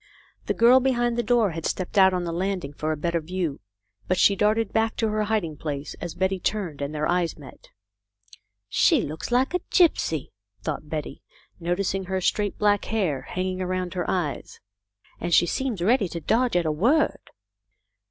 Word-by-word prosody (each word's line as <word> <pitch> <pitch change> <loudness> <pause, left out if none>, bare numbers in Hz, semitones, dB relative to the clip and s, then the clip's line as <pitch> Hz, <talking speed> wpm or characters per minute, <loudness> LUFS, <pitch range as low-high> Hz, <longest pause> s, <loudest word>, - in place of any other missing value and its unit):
The - - 0
girl 240 +3 +6
behind 240 -2 +1
the 240 - +1
door 235 -4 +2
had 165 0 -6
stepped 185 +2 -3
out 190 -1 +6
on 180 -1 -1
the 170 - -3
landing 180 -4 -2
for 155 +1 -2
a 155 - -2
better 170 +2 -1
view, 170 -3 -3 0.5
but 185 - +1
she 200 - +5
darted 215 +2 +1
back 225 0 +1
to 225 - 0
her 215 0 0
hiding 200 -8 -1
place 145 -2 -5
as 175 - -5
Betty 190 +1 0
turned, 180 -8 -2
and 140 +1 -2
their 150 0 -1
eyes 175 -1 0
met. 145 -3 -14 0.5
" 100 0 -25
She - - +5
looks 155 +2 -5
like 255 +6 +2
a 360 - +2
gypsy," 235 - +2 0.3
thought 150 - -4
Betty, 150 -3 -5 0.4
noticing 185 +2 -1
her 190 +1 -1
straight 205 +2 0
black 205 -1 +2
hair 185 - -1
hanging 185 0 -2
around 185 -1 -2
her 180 -1 -2
eyes. 170 -7 -3 0.6
"And 175 -1 +1
she - - +5
seems 225 -1 -2
ready 220 0 +3
to 170 - -5
dodge 230 +8 +1
at 175 -1 +2
a 155 - +1
word." 240 - +1
185 Hz, 185 wpm, -25 LUFS, 160-215 Hz, 0.6 s, girl